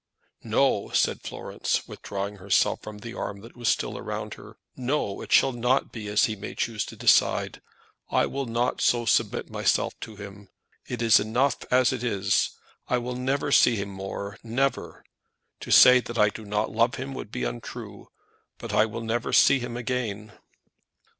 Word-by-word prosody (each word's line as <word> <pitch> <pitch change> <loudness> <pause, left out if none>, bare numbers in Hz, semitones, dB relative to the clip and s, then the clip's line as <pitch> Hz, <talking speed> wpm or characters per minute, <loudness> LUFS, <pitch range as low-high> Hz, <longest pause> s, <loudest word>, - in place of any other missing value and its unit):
"No," - - +1
said - - +2
Florence, - - -3
withdrawing 100 +1 -5
herself 95 +1 +1
from 110 -1 -9
the 115 +3 -8
arm 100 -4 -5
that 115 +3 -14
was 120 -2 -1
still - - -1
around - - -5
her. - - -13 0.2
"No; 125 -5 -2
it - - -9
shall 135 - +5
not 125 +2 0
be 110 -3 -7
as 105 0 +3
he 110 - -3
may 100 - -8
choose 110 -3 -1
to - - -10
decide. - - +2 0.5
I - - +2
will 135 -1 -4
not 120 +2 -1
so 120 -1 +2
submit - - +1
myself - - +1
to 110 - -8
him. 100 0 -11 0.4
It 120 -2 -3
is 115 -1 +6
enough 120 +7 +1
as 125 0 +3
it 125 -2 -4
is. 100 -4 +1 0.4
I 125 - +1
will 125 +1 -4
never 135 +3 -1
see 120 -3 +5
him 100 -1 -3
more; 100 +1 -6
never. 130 +4 -2 0.6
To - - -9
say 125 0 +8
that 120 -1 -7
I 105 -1 +5
do 110 +1 -9
not 105 +1 -1
love 115 +2 +2
him 130 +1 -5
would 110 - -7
be 60 - -4
untrue, - - -7 0.5
but - - -7
I 110 - +4
will 115 +1 -6
never 115 +1 -2
see 140 - +5
him 120 -1 -5
again." 115 -4 -3
115 Hz, 180 wpm, -26 LUFS, 105-125 Hz, 0.6 s, say